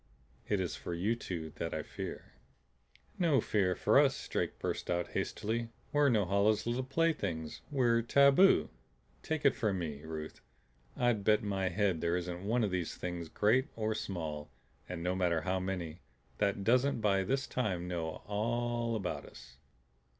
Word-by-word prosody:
It 105 Hz, -, +1 dB
is 90 Hz, -2 st, -2 dB
for 85 Hz, -, -5 dB
you 100 Hz, +7 st, +1 dB
two 85 Hz, -8 st, -5 dB
that 80 Hz, -, -3 dB
I 80 Hz, -, -2 dB
fear." -, -, -7 dB, 0.9 s
"No 160 Hz, -7 st, +4 dB
fear 95 Hz, -4 st, +1 dB
for -, -, +4 dB
us," -, -, +2 dB
Drake -, -, -2 dB
burst -, -, -3 dB
out 85 Hz, 0 st, 0 dB
hastily. 115 Hz, +2 st, -2 dB, 0.2 s
"We're 145 Hz, -1 st, +5 dB
Norhala's 105 Hz, -1 st, +2 dB
little 120 Hz, +2 st, 0 dB
playthings. 130 Hz, -, -1 dB
We're 120 Hz, -5 st, +3 dB
tabu. 140 Hz, +9 st, +5 dB, 0.5 s
Take 160 Hz, -2 st, -3 dB
it 140 Hz, -, +6 dB
from 105 Hz, -4 st, 0 dB
me, 75 Hz, -5 st, -4 dB
Ruth, 80 Hz, 0 st, -7 dB, 0.6 s
I'd 120 Hz, -4 st, +2 dB
bet 105 Hz, +1 st, +4 dB
my 95 Hz, -2 st, 0 dB
head 95 Hz, -3 st, +1 dB
there 85 Hz, +1 st, +1 dB
isn't 90 Hz, 0 st, -4 dB
one 115 Hz, +4 st, +1 dB
of 105 Hz, -, 0 dB
these 90 Hz, -3 st, -2 dB
Things, 85 Hz, -2 st, -5 dB
great 125 Hz, -, +3 dB
or 110 Hz, -1 st, 0 dB
small, 80 Hz, -8 st, -4 dB, 0.4 s
and 85 Hz, -2 st, -4 dB
no 90 Hz, +1 st, +1 dB
matter 90 Hz, -3 st, +1 dB
how 95 Hz, +3 st, 0 dB
many, 90 Hz, -3 st, -4 dB, 0.4 s
that 100 Hz, -1 st, +1 dB
doesn't 125 Hz, +4 st, +3 dB
by 100 Hz, -3 st, +3 dB
this 135 Hz, +6 st, 0 dB
time 95 Hz, -8 st, -2 dB
know 85 Hz, -3 st, -4 dB
all 120 Hz, +2 st, -1 dB
about 90 Hz, -8 st, -3 dB
us. 60 Hz, 0 st, -14 dB
100 Hz, 160 wpm, -33 LUFS, 85-120 Hz, 0.9 s, it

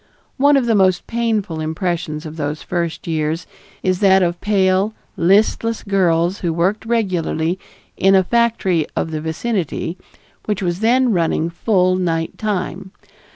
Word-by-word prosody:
One 285 Hz, +1 st, +5 dB
of 265 Hz, -, +1 dB
the 230 Hz, -, +2 dB
most 185 Hz, -3 st, +3 dB
painful 220 Hz, -8 st, -1 dB
impressions 160 Hz, -1 st, -3 dB
of 155 Hz, 0 st, -7 dB
those 150 Hz, 0 st, -4 dB
first 170 Hz, -2 st, -3 dB
years 160 Hz, +1 st, -2 dB, 0.4 s
is 185 Hz, -1 st, +1 dB
that 190 Hz, -1 st, +5 dB
of 175 Hz, 0 st, -1 dB
pale, 195 Hz, 0 st, +2 dB, 0.2 s
listless 210 Hz, +5 st, +2 dB
girls, 180 Hz, -2 st, +1 dB
who 170 Hz, -, -1 dB
worked 185 Hz, +7 st, 0 dB
regularly 185 Hz, -6 st, 0 dB, 0.4 s
in 195 Hz, +1 st, +4 dB
a 190 Hz, -, +5 dB
factory 195 Hz, -7 st, +1 dB
of 160 Hz, -, -2 dB
the 155 Hz, -1 st, -3 dB
vicinity 170 Hz, 0 st, -3 dB, 0.5 s
which 205 Hz, -2 st, -2 dB
was 175 Hz, 0 st, -1 dB
then 245 Hz, +3 st, +3 dB
running 165 Hz, -2 st, 0 dB
full 185 Hz, 0 st, +2 dB
night 165 Hz, -3 st, -2 dB
time. 195 Hz, -3 st, -3 dB
185 Hz, 145 wpm, -19 LUFS, 165-210 Hz, 0.5 s, One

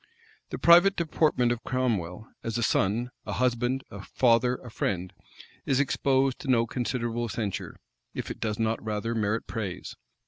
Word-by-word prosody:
The -, -, -4 dB
private 175 Hz, +4 st, +6 dB
deportment 155 Hz, -7 st, +2 dB
of 120 Hz, -1 st, -3 dB
Cromwell, 110 Hz, -6 st, -1 dB, 0.2 s
as 115 Hz, 0 st, -2 dB
a 120 Hz, -, 0 dB
son, 110 Hz, +5 st, +1 dB
a -, -, -5 dB
husband, 125 Hz, +1 st, 0 dB
a 100 Hz, -, -7 dB
father, 125 Hz, +3 st, +2 dB
a 125 Hz, -2 st, -11 dB
friend, 90 Hz, -3 st, -2 dB, 0.5 s
is 135 Hz, -, +2 dB
exposed 135 Hz, -1 st, +1 dB
to -, -, -8 dB
no 120 Hz, -3 st, +4 dB
considerable 120 Hz, -1 st, -2 dB
censure, 105 Hz, -4 st, -4 dB, 0.4 s
if -, -, -4 dB
it -, -, -7 dB
does 105 Hz, -1 st, -2 dB
not 115 Hz, 0 st, -1 dB
rather 110 Hz, +1 st, -2 dB
merit 110 Hz, 0 st, 0 dB
praise. 100 Hz, -6 st, -5 dB
120 Hz, 160 wpm, -27 LUFS, 110-130 Hz, 0.5 s, private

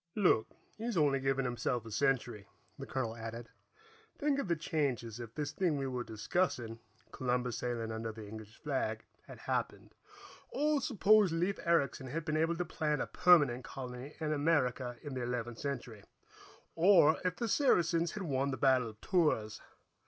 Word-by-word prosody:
"Look, 180 Hz, -, +3 dB, 0.3 s
he's 230 Hz, -3 st, -2 dB
only 145 Hz, -3 st, +3 dB
giving 135 Hz, 0 st, 0 dB
himself 120 Hz, -1 st, -1 dB
a 115 Hz, -, -9 dB
century," 120 Hz, -3 st, 0 dB, 0.3 s
the -, -, -6 dB
colonel 115 Hz, -4 st, -2 dB
added. 115 Hz, +1 st, -7 dB, 0.7 s
"Think 285 Hz, -1 st, +1 dB
of 275 Hz, -, -2 dB
the 170 Hz, -, +2 dB
changes 135 Hz, -8 st, -2 dB
if 115 Hz, -1 st, -8 dB
this 145 Hz, -1 st, -2 dB
thing 160 Hz, -1 st, 0 dB
we 135 Hz, -, -2 dB
were 125 Hz, -2 st, -3 dB
discussing, 115 Hz, -, -1 dB, 0.3 s
Columbus 125 Hz, -2 st, -1 dB
sailing 115 Hz, -2 st, -3 dB
under 110 Hz, 0 st, -4 dB
the 110 Hz, -1 st, -9 dB
English 110 Hz, 0 st, -10 dB
flag, 130 Hz, -7 st, -2 dB, 0.2 s
had -, -, -10 dB
happened. -, -, -3 dB, 0.6 s
Or 295 Hz, +1 st, +1 dB
suppose 215 Hz, -, +4 dB
Leif 175 Hz, +4 st, 0 dB
Ericson 140 Hz, -6 st, +1 dB
had 150 Hz, +5 st, -4 dB
been 155 Hz, -2 st, -1 dB
able 165 Hz, +2 st, +2 dB
to 180 Hz, -, -1 dB
plant 150 Hz, -2 st, -1 dB
a -, -, 0 dB
permanent 145 Hz, -9 st, +4 dB
colony 130 Hz, +2 st, -7 dB
in 155 Hz, -1 st, -1 dB
America 135 Hz, -5 st, +1 dB
in 145 Hz, -3 st, -6 dB
the 130 Hz, -, -3 dB
Eleventh 120 Hz, -1 st, -3 dB
Century, 125 Hz, -6 st, -5 dB, 0.7 s
or 170 Hz, -3 st, +6 dB
if 180 Hz, -1 st, 0 dB
the 235 Hz, -, -2 dB
Saracens 170 Hz, -, +2 dB
had 205 Hz, -, -4 dB
won 140 Hz, -4 st, 0 dB
the 130 Hz, -, -3 dB
Battle 130 Hz, -3 st, +3 dB
of 110 Hz, 0 st, -14 dB
Tours. 150 Hz, -, +1 dB
135 Hz, 165 wpm, -33 LUFS, 120-165 Hz, 0.7 s, or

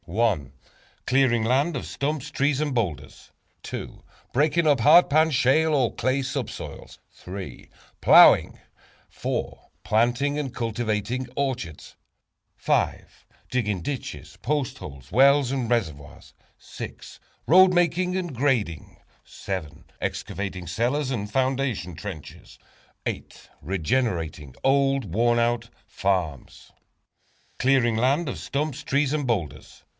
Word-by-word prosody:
=Clearing 130 Hz, -3 st, +3 dB
Land 135 Hz, +6 st, +1 dB
of -, -, -5 dB
Stumps, 145 Hz, -1 st, -3 dB
Trees 140 Hz, 0 st, +1 dB
and 150 Hz, -2 st, -1 dB
Boulders,= 80 Hz, -, -4 dB, 1.0 s
=Breaking 150 Hz, +5 st, +2 dB
up 145 Hz, -3 st, +4 dB
Hard 175 Hz, +10 st, +7 dB
Pan, 155 Hz, +2 st, +4 dB
Shale, 150 Hz, +4 st, +3 dB
or 130 Hz, -5 st, +1 dB
Clay 130 Hz, +3 st, 0 dB
Subsoils,= 130 Hz, -1 st, -6 dB, 1.0 s
=Plowing,= -, -, +7 dB, 1.2 s
=Planting 120 Hz, +6 st, +1 dB
and 135 Hz, -4 st, -4 dB
Cultivating 115 Hz, +1 st, -2 dB
Orchards,= 125 Hz, -, -4 dB, 1.6 s
=Digging 105 Hz, -7 st, -1 dB
Ditches, 80 Hz, -, -6 dB
Post 130 Hz, -2 st, -2 dB
Holes, 70 Hz, -3 st, -10 dB
Wells 135 Hz, +1 st, +5 dB
and 130 Hz, -4 st, -2 dB
Reservoirs,= 80 Hz, -, -3 dB, 1.1 s
=Road 185 Hz, +3 st, +7 dB
Making 180 Hz, +1 st, +1 dB
and 175 Hz, -7 st, -4 dB
Grading,= 115 Hz, -, -1 dB, 1.0 s
=Excavating 95 Hz, -3 st, -4 dB
Cellars 125 Hz, -, -1 dB
and 105 Hz, -5 st, -3 dB
Foundation 130 Hz, -, -1 dB
Trenches,= 85 Hz, -4 st, -9 dB, 1.0 s
=Regenerating 85 Hz, -, -2 dB
Old, 135 Hz, -7 st, +2 dB
Worn 120 Hz, +3 st, +3 dB
out 120 Hz, 0 st, 0 dB, 0.2 s
Farms.= 90 Hz, -8 st, -3 dB, 0.9 s
Clearing 130 Hz, -3 st, +3 dB
Land 135 Hz, +8 st, +1 dB
of 130 Hz, -, -4 dB
Stumps, 150 Hz, 0 st, -3 dB
Boulders 140 Hz, 0 st, +1 dB
and 145 Hz, -3 st, -1 dB
Trees. 95 Hz, -10 st, -4 dB
125 Hz, 95 wpm, -25 LUFS, 105-140 Hz, 1.6 s, Hard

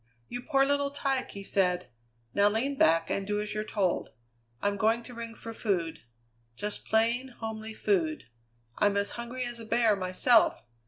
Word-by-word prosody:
"You 245 Hz, -, -4 dB
poor 275 Hz, 0 st, +3 dB
little 285 Hz, 0 st, +1 dB
tyke!" 275 Hz, -2 st, -1 dB
he 200 Hz, -, -8 dB
said. 180 Hz, -6 st, +1 dB, 0.4 s
"Now 205 Hz, +1 st, +5 dB
lean 250 Hz, +7 st, 0 dB
back 165 Hz, -8 st, +3 dB
and 195 Hz, 0 st, -1 dB
do 205 Hz, 0 st, 0 dB
as 210 Hz, 0 st, -2 dB
you're 215 Hz, 0 st, -1 dB
told. 195 Hz, -4 st, 0 dB, 0.5 s
I'm 205 Hz, 0 st, 0 dB
going 225 Hz, +3 st, +2 dB
to 245 Hz, -, -11 dB
ring 230 Hz, -1 st, -6 dB
for 230 Hz, 0 st, -8 dB
food. 175 Hz, -8 st, -1 dB, 0.6 s
Just 210 Hz, -, -3 dB
plain, 230 Hz, +4 st, +2 dB
homely 220 Hz, -1 st, -5 dB
food. 325 Hz, -, +1 dB, 0.6 s
I'm 205 Hz, -1 st, +3 dB
as 200 Hz, 0 st, 0 dB
hungry 240 Hz, +2 st, -4 dB
as 240 Hz, -1 st, -5 dB
a 225 Hz, -, -8 dB
bear 225 Hz, -1 st, +3 dB
myself. 195 Hz, +5 st, +3 dB
220 Hz, 170 wpm, -29 LUFS, 200-245 Hz, 0.6 s, Now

